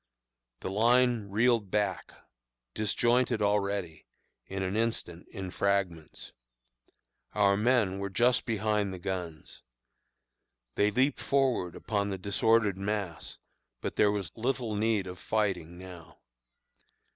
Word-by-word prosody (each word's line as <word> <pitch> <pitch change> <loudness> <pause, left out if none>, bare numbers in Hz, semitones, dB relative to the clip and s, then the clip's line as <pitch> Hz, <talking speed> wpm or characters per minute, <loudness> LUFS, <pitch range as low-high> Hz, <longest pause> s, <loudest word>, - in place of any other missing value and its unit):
"The 95 - -4
line 120 0 +3
reeled 110 0 +2
back 100 -2 -1 0.6
disjointed 120 +3 +2
already 100 -5 -1 0.4
in 95 0 -3
an 95 +2 -2
instant 110 -7 -2
in 95 -1 -7
fragments. 95 -6 -2 1.0
Our 100 -2 +4
men 105 -3 +2
were 100 0 -3
just 120 +6 +2
behind 105 -2 0
the 95 - -6
guns. 90 -4 -6 1.1
They 105 - +3
leaped 130 +6 +1
forward 130 -11 +1
upon 100 -2 -1
the 95 - -3
disordered 100 +1 +2
mass; 100 -4 -3 0.4
but - - -4
there 105 - +4
was 100 -4 -3
little 120 -1 -1
need 105 -1 +1
of 90 -1 -8
fighting 95 -6 -1
now. 90 -2 -11
100 Hz, 115 wpm, -29 LUFS, 95-115 Hz, 1.1 s, Our